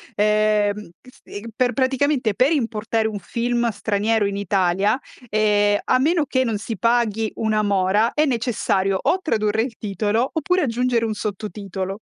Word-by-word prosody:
Ehm, 210 -1 +1
che 255 - -17
ste 205 - -10
per 250 0 +2
praticamente, 260 -3 +1
per 265 +4 +3
importare 225 -5 0
un 210 -2 -4
film 235 +4 -1
straniero 215 0 0
in 200 0 -2
Italia, 200 +3 +1 0.3
ehm, 205 -1 +2
a 255 - +3
meno 315 +2 +2
che 260 -2 +1
non 225 -4 -1
si 220 +1 -5
paghi 225 -1 +1
una 215 -1 0
mora 200 +2 +2
è 305 - +2
necessario 215 -6 0
o 375 - +1
tradurre 215 - 0
il 235 -2 -4
titolo, 215 +4 -1
oppure 360 +4 +1
aggiungere 245 -2 0
un 220 - -1
sottotitolo. 200 -1 -5
220 Hz, 155 wpm, -21 LUFS, 205-245 Hz, 0.3 s, per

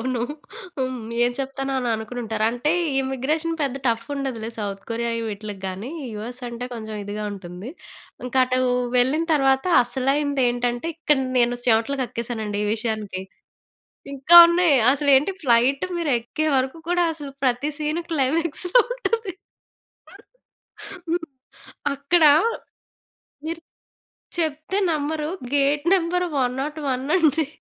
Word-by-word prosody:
అవును. 250 0 -2 0.6
హ్మ్. 255 -1 -2 0.2
ఏం 240 - +3
చెప్తానో 270 0 -3
అని 250 -2 -2
అనుకొనుంటారు. 220 -1 -3
అంటే, 245 +7 0 0.3
ఇమ్మిగ్రేషన్ 285 +5 -1
పెద్ద 270 -2 -1
టఫ్ఫుండదులే 235 -1 -2
సౌత్ 200 -2 -4
కొరియా 235 +1 -1
ఇవ్విట్లకి 210 -2 -6
గానీ, 190 +7 -5 0.2
యూఎస్ 235 +4 -7
అంటే 235 +1 -6
కొంచం 220 -1 -7
ఇదిగా 205 +1 -5
ఉంటుంది. 185 +2 -8 0.6
ఇంక 250 - -6
అటూ 255 0 0 0.4
వెళ్ళిన 265 +7 +3
తర్వాత 270 -2 +2 0.2
అసలైందేంటంటే, 250 0 0
ఇక్కడ 300 -4 +2 0.2
నేను 245 0 +2
చెమట్లు 230 +4 +2
కక్కేసానండి 225 -4 -4
ఈ - - -1
విషయానికి. 215 -4 -3 0.9
ఇంకా 280 +6 +5
ఉన్నాయి. 340 -3 +3 0.2
అసలేంటి 285 +4 +3
ఫ్లైట్ 250 +2 +3
మీరెక్కే 285 -1 -1
వరకు 265 +5 -2
కూడా 355 0 +2
అసలు 290 -3 -8
ప్రతి 255 +3 +1
సీను 305 +2 -2
క్లైమాక్స్‌లా 330 - +2
ఉంటది. 455 -5 -2 1.8
హ్మ్. 340 0 -1 0.7
అక్కడ, 295 +5 +2 1.2
మీరు 330 +1 -4 0.8
చెప్తే 315 +3 -2
నమ్మరు, 305 0 -2 0.3
గేట్ 285 +1 +2
నంబర్ 360 0 0
101 265 +1 -2
అండి. 315 -2 +2
265 Hz, 110 wpm, -23 LUFS, 235-305 Hz, 1.8 s, ఇంకా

